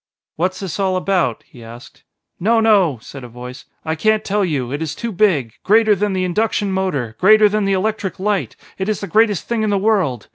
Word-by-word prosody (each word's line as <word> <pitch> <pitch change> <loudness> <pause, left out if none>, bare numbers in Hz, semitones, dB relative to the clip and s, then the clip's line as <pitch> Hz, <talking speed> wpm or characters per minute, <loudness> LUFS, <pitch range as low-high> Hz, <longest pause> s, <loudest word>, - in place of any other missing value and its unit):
"What's 185 +3 -2
this 190 -1 -5
all 190 -1 +1
about?" 185 -9 0
he 120 - -15
asked. 115 +2 -13 0.4
"No 225 +5 +2
no!" 200 - +3
said 135 -2 -10
a - - -8
voice; 125 +2 -10 0.2
"I 160 - -1
can't 215 +6 +1
tell 205 +1 0
you 140 -9 -2
it 145 +3 -4
is 160 -1 -3
too 235 - -4
big 170 - +1
greater 215 +1 +4
than 205 +1 -1
the 185 -1 -1
induction 205 +2 0
motor 150 -12 -2
greater 215 +2 +6
than 210 0 0
the 195 - +1
electric 195 -1 -2
light 190 - -1 0.2
it 190 +2 -2
is 215 - -1
the - - -3
greatest 215 -4 +2
thing 235 -2 -1
in 215 - 0
the 200 - +1
world. 190 - 0
190 Hz, 215 wpm, -18 LUFS, 150-210 Hz, 0.4 s, greater